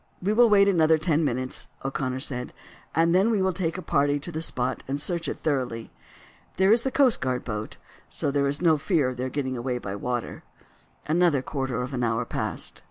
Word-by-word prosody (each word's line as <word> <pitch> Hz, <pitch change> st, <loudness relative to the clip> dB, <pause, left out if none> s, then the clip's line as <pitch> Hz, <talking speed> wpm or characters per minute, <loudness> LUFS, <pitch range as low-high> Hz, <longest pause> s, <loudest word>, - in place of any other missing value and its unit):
"We 200 Hz, +4 st, 0 dB
will 235 Hz, +1 st, +6 dB
wait 200 Hz, -1 st, +6 dB
another 160 Hz, -4 st, +4 dB
ten 155 Hz, 0 st, +1 dB
minutes," 130 Hz, -1 st, -3 dB, 0.2 s
O'Connor 130 Hz, -1 st, -2 dB
said, 125 Hz, -3 st, -4 dB, 0.4 s
"and 165 Hz, +1 st, +3 dB
then 190 Hz, +5 st, +4 dB
we 220 Hz, -3 st, +2 dB
will 190 Hz, -1 st, +1 dB
take 170 Hz, -1 st, -2 dB
a 185 Hz, -, -6 dB
party 145 Hz, -2 st, +2 dB
to 175 Hz, -, -6 dB
the 160 Hz, 0 st, -4 dB
spot 130 Hz, -5 st, -1 dB
and 140 Hz, +2 st, -2 dB
search 170 Hz, +1 st, 0 dB
it -, -, -4 dB
thoroughly. 130 Hz, -6 st, -2 dB, 0.7 s
There 190 Hz, +1 st, +4 dB
is 230 Hz, +1 st, +5 dB
the 265 Hz, -, -1 dB
coast 260 Hz, -3 st, +3 dB
guard 125 Hz, -1 st, -1 dB
boat, 110 Hz, -2 st, -5 dB, 0.3 s
so 140 Hz, -, -1 dB
there 140 Hz, 0 st, +1 dB
is 145 Hz, +5 st, -1 dB
no 160 Hz, -3 st, +4 dB
fear 150 Hz, -5 st, +1 dB
of 125 Hz, -, -6 dB
their 130 Hz, +1 st, -2 dB
getting 130 Hz, -1 st, -2 dB
away 125 Hz, +1 st, -2 dB
by 100 Hz, -5 st, -5 dB
water." 120 Hz, +4 st, -3 dB, 0.6 s
Another 160 Hz, -4 st, +2 dB
quarter 130 Hz, -3 st, -2 dB
of 130 Hz, +2 st, -6 dB
an 125 Hz, -1 st, -1 dB
hour 115 Hz, 0 st, 0 dB
passed. -, -, -4 dB
145 Hz, 210 wpm, -26 LUFS, 130-175 Hz, 0.7 s, will